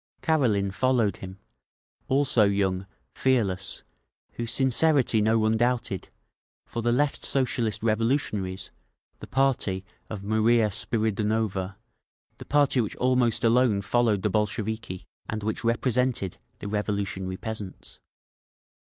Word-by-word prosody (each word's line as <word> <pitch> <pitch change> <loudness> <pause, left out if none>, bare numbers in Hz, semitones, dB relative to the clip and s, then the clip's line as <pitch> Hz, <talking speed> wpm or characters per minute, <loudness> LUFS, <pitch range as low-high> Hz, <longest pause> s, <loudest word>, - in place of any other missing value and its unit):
Karelin 115 -12 +2
followed 120 -4 +1
him—also 105 - -2
young, 95 -1 0 0.3
fearless, 100 -8 0 0.5
whose 120 -1 -4
sincerity 130 -3 +3
no 110 +2 +3
one 110 0 +2
doubted—for 120 -1 -4
the 120 +1 +1
Left 140 +4 0
Socialist 120 -5 +1
Revolutionaries, 110 -5 -1 0.5
the - - -9
party 125 -8 0 0.2
of 105 -3 -6
Maria 110 +1 +2
Spiridonova, 105 -2 0 0.6
the - - -9
party 145 -3 +3
which 110 - -4
almost 125 -2 +1
alone 115 -3 +3
followed 110 -2 +1
the 105 - +1
Bolsheviki, 110 -1 -2 0.2
and 110 -1 -4
which 110 +2 -2
represented 120 -3 0 0.2
the - - -7
revolutionary 100 -3 -2
peasants. 110 -4 -6
110 Hz, 105 wpm, -26 LUFS, 100-125 Hz, 0.6 s, sincerity